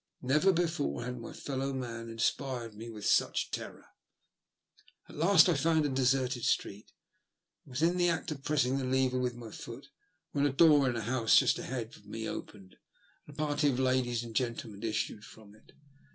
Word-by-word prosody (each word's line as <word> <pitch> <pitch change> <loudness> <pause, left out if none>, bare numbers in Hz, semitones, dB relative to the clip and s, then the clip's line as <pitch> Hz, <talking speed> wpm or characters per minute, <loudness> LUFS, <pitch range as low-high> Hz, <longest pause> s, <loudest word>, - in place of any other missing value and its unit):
Never 150 +9 +4
before 165 - -1
had 125 0 -5
my 115 - -8
fellow 135 0 -3
man 115 -3 -5
inspired 115 +1 -2
me 115 +3 -9
with 105 -2 -8
such - - +2
terror. - - -6 1.2
At - - -13
last 165 +2 +6
I 175 - +4
found 160 +1 +2
a - - +1
deserted 130 -2 +1
street, 100 +2 -1 0.7
and 135 - -14
was 135 +5 -1
in 175 +2 +3
the 175 -1 +3
act 165 -1 -2
of 145 -3 -6
pressing 140 -3 +1
the - - -3
lever 130 0 +1
with 125 -1 -1
my 115 -2 -9
foot 125 +6 -9 0.4
when 145 0 +2
a - - -1
door 145 -2 +5
in 120 - -2
a 115 - -3
house 115 0 +2
just - - +4
ahead 120 -3 -5
of 105 - -20
me 110 +1 -5
opened, 95 -2 -8 0.5
and 145 - -12
a - - -18
party 150 -1 +1
of 130 - -1
ladies 130 -2 +1
and 115 -1 -9
gentlemen 115 -4 -3
issued 110 -2 -2
from 105 -2 -14
it. 110 - -21
130 Hz, 190 wpm, -31 LUFS, 115-145 Hz, 1.2 s, last